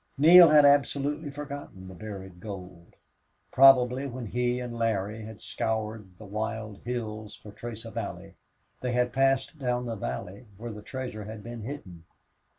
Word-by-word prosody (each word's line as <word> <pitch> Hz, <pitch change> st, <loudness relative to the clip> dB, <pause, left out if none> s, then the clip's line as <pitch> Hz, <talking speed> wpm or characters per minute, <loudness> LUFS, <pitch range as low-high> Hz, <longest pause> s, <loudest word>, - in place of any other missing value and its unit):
Neale 170 Hz, +4 st, +9 dB
had 150 Hz, -1 st, +7 dB
absolutely 145 Hz, +1 st, +2 dB
forgotten 140 Hz, -9 st, -8 dB
the 95 Hz, -, -9 dB
buried 95 Hz, -2 st, -8 dB
gold. 90 Hz, -3 st, -9 dB, 0.6 s
Probably 130 Hz, 0 st, +6 dB
when 125 Hz, -2 st, -6 dB
he 125 Hz, +3 st, 0 dB
and 120 Hz, -1 st, -5 dB
Larry 110 Hz, -2 st, -1 dB
had 110 Hz, -1 st, -10 dB
scoured 110 Hz, -4 st, -3 dB
the 110 Hz, -, -11 dB
wild 105 Hz, 0 st, -4 dB
hills 110 Hz, -3 st, -4 dB
for 105 Hz, -, -12 dB
trace 110 Hz, +1 st, -7 dB
of -, -, -9 dB
Allie -, -, -5 dB, 0.5 s
they 125 Hz, -1 st, -1 dB
had 125 Hz, 0 st, +1 dB
passed 135 Hz, +3 st, +1 dB
down 125 Hz, -2 st, -1 dB
the 115 Hz, -1 st, -3 dB
valley 100 Hz, +2 st, -6 dB
where 115 Hz, +2 st, -6 dB
the 105 Hz, -1 st, -8 dB
treasure 125 Hz, -3 st, -6 dB
had 110 Hz, 0 st, -8 dB
been 120 Hz, -1 st, -7 dB
hidden. 100 Hz, -, -8 dB
115 Hz, 155 wpm, -28 LUFS, 105-130 Hz, 0.6 s, Neale